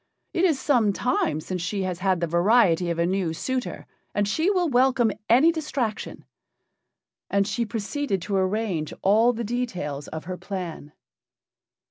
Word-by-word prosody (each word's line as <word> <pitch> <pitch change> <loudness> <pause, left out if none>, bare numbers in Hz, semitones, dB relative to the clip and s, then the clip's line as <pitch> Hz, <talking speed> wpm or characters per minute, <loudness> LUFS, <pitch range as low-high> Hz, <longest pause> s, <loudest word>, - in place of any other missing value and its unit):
It 350 - +2
is 315 -7 +2
some 240 -7 +2
time 175 -10 0
since 180 +2 -4
she 195 +3 -2
has 180 -2 -3
had 185 -2 +1
the - - +2
variety 175 0 +3
of 170 - -1
a 170 - +2
new 180 -2 0
suitor, 255 +8 -3 0.3
and 205 0 +1
she 320 - +1
will 365 -4 +2
welcome 250 -4 +3 0.2
any 265 +9 +6
distraction." 280 -9 -3 1.0
And 200 0 +2
she 225 +2 -1
proceeded 220 +1 -2
to 205 - -2
arrange 190 -4 -1
all 220 +5 +5
the 235 0 -4
details 190 - -3
of 160 0 -6
her 185 +1 -5
plan. 175 -7 -6
205 Hz, 155 wpm, -25 LUFS, 180-245 Hz, 1.0 s, any